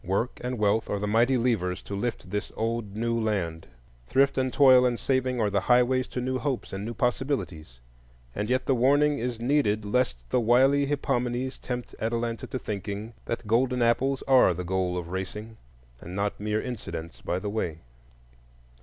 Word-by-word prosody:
Work 100 +7 -1
and 125 0 -2
wealth 105 +1 +1
are 105 - 0
the 100 - -2
mighty 120 +5 +3
levers 100 -7 0
to 100 - -6
lift 105 -3 -4
this 105 +1 -3
old 115 -2 -2
new 115 +2 -1
land; 90 -7 -2 0.4
thrift 135 +2 +3
and 130 -1 0
toil 130 -1 +6
and 125 -2 +1
saving 130 -2 0
are 105 -2 +1
the 100 - +2
highways 125 +1 +4
to - - -5
new 130 +1 -1
hopes 135 -8 -3
and 95 +1 -4
new 115 +2 -5
possibilities; 120 - -2 0.5
and 105 +2 -3
yet 130 0 +1
the 135 - +3
warning 145 +4 +3
is 120 -1 -3
needed 120 -5 +1
lest 100 - 0
the - - +3
wily 135 +5 +4
Hippomenes 130 -2 -1
tempt 125 -1 -5
Atalanta 115 +1 -2
to - - -4
thinking 105 0 -5
that 115 - -4
golden 125 +3 +2
apples 130 +3 +1
are 130 -9 +5
the 90 - -4
goal 90 0 -1
of 85 -1 -5
racing, 105 +4 -5 0.4
and 90 +2 -9
not 100 +1 -1
mere 105 +1 -1
incidents 85 -10 -6
by 90 - -2
the 100 +2 -4
way. 85 -7 -3
115 Hz, 180 wpm, -27 LUFS, 100-130 Hz, 0.5 s, toil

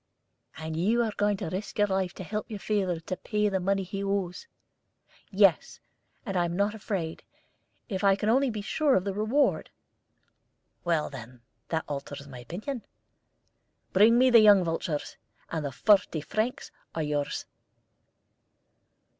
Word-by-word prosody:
"And 160 0 -5
you 220 +9 +2
are 220 -2 -2
going 205 -1 +1
to 165 - -4
risk 195 +1 -5
your 205 - +4
life 190 -2 -1
to - - -7
help 210 +4 -4
your 215 - -5
father 195 -4 -1
to 185 +3 -4
pay 210 +2 0
the 190 -1 0
money 195 +1 0
he 195 +2 -5
owes?" 195 - -2 0.8
"Yes; 195 -3 +3 0.5
and 195 -4 -4
I 175 - +3
am 170 0 -3
not 200 +2 +1
afraid, 195 -7 -4 0.7
if 195 -3 -3
I 195 -1 +5
can 210 - -3
only 260 +4 +3
be 215 -3 -4
sure 295 +5 +2
of 185 - +2
the 200 0 -2
reward." 220 +8 +1 1.1
"Well, 165 -4 0
then, 125 -2 -10 0.3
that 160 -1 -1
alters 140 0 -6
my 130 -3 -10
opinion. 215 - -6 1.1
Bring 220 +5 +6
me 255 +1 +5
the 235 - +9
young 205 -3 +7
vultures, 165 -2 -3 0.3
and 160 -2 -2
the 140 - -3
forty 180 +1 +3
francs 220 - -2 0.2
are 160 - -1
yours." 145 -1 -2
195 Hz, 155 wpm, -28 LUFS, 165-215 Hz, 1.1 s, the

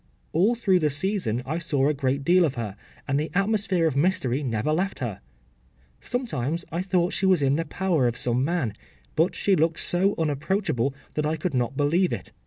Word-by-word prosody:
” - - -39
‘All 200 +9 +3
through 195 -6 +2
the 155 -3 +2
season 145 - -1
I 155 +5 -2
saw 145 -5 +1
a 150 - +2
great 135 0 -1
deal 180 +4 +5
of 145 -5 0
her, 110 -5 -4 0.3
and 140 0 +1
the 155 +1 -2
atmosphere 195 -3 +1
of 155 -4 +1
mystery 145 -4 +1
never 125 +2 -1
left 190 +5 -1
her. 115 -7 -4 0.8
Sometimes 170 - -2
I 170 - -1
thought 185 -2 +1
that - - -4
she 190 - +1
was 185 -6 +4
in 135 0 +3
the 165 +2 -1
power 165 -5 +1
of 120 - -2
some 125 +1 +1
man, 155 - -1 0.4
but 165 +3 +2
she 200 - +2
looked 165 0 +1
so 190 +3 +1
unapproachable, 150 - 0 0.2
that 150 0 0
I 155 - 0
could 165 +2 -2
not 125 +1 -1
believe 170 +6 +2
it. - - -5
155 Hz, 205 wpm, -25 LUFS, 135-185 Hz, 0.8 s, deal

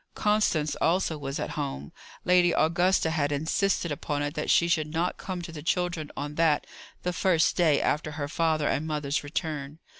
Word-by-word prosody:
Constance 205 -8 +1
also 170 -1 +2
was 140 -2 -5
at - - -3
home. 70 +2 -4 0.3
Lady 175 -1 +4
Augusta 170 +1 +2
had 145 -3 0
insisted 160 +4 0
upon 145 0 -2
it 145 0 -3
that 150 - -3
she 170 - +4
should 160 -3 +1
not 170 +3 -1
come 185 -2 -5
to 170 - -7
the 155 -2 -8
children 175 -1 -1
on 145 +1 -4
that, 160 -1 +2 0.4
the 180 - -1
first 175 -2 +2
day 160 -5 +3
after 150 0 -1
her 145 -2 -3
father 155 -1 +1
and 155 - -1
mother's 150 -1 -1
return. 150 -1 -4
160 Hz, 180 wpm, -27 LUFS, 145-175 Hz, 0.4 s, Lady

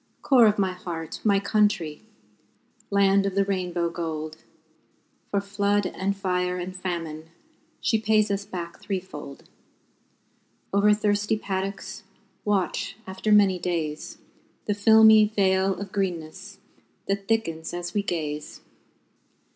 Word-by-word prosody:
Core 250 -5 +6
of 210 - +2
my 190 -2 +1
heart, 165 -3 -6
my 200 -2 +4
country! 200 -7 +1 0.9
Land 200 0 +3
of 195 - -3
the 200 0 +3
Rainbow 180 -3 -1
Gold, 155 -2 -4 0.9
For 200 - +1
flood 200 0 0
and 195 +2 -2
fire 180 -1 -1
and 180 +1 -5
famine, 165 -4 -5 0.5
She 220 - +2
pays 215 -1 +3
us 200 0 -1
back 175 -4 -7
threefold; 180 -8 -6 1.3
Over 200 +1 +5
thirsty 210 0 +1
paddocks, 195 -1 -4 0.4
Watch, 195 -1 0
after 190 +3 -3
many 200 -3 +5
days, 165 -4 -3 0.5
The 205 - +1
filmy 220 +1 +7
veil 190 -2 +1
of 200 -1 -6
greenness 190 +1 -4 0.5
That 195 0 -2
thickens 165 -8 -1
as 175 +1 -5
we 205 - +1
gaze. 155 -6 -4
195 Hz, 120 wpm, -25 LUFS, 175-205 Hz, 1.3 s, filmy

